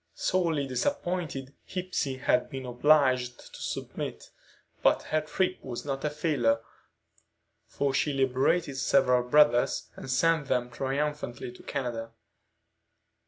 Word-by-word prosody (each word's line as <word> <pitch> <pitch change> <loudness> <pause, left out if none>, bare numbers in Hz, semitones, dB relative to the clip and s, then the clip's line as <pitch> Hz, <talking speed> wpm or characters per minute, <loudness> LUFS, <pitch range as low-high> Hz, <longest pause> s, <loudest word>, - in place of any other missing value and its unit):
Sorely 165 -6 +1
disappointed, 165 - -2
Hepsey 180 -8 -2
had 125 -1 +1
been 135 -1 -6
obliged 130 -1 +2
to - - -10
submit; - - -5 0.5
but - - +3
her 155 - 0
trip 185 +4 -1
was 125 0 -6
not 135 -1 -3
a 150 - +1
failure, 145 -7 +1 1.1
for 140 -1 -1
she 145 +2 +1
liberated 135 +3 +1
several 125 -1 +3
brothers 150 -4 +4
and - - -9
sent 160 +3 +2
them 125 -2 0
triumphantly 135 -2 -3
to 125 - -14
Canada. 115 -4 -4
135 Hz, 120 wpm, -28 LUFS, 125-150 Hz, 1.1 s, brothers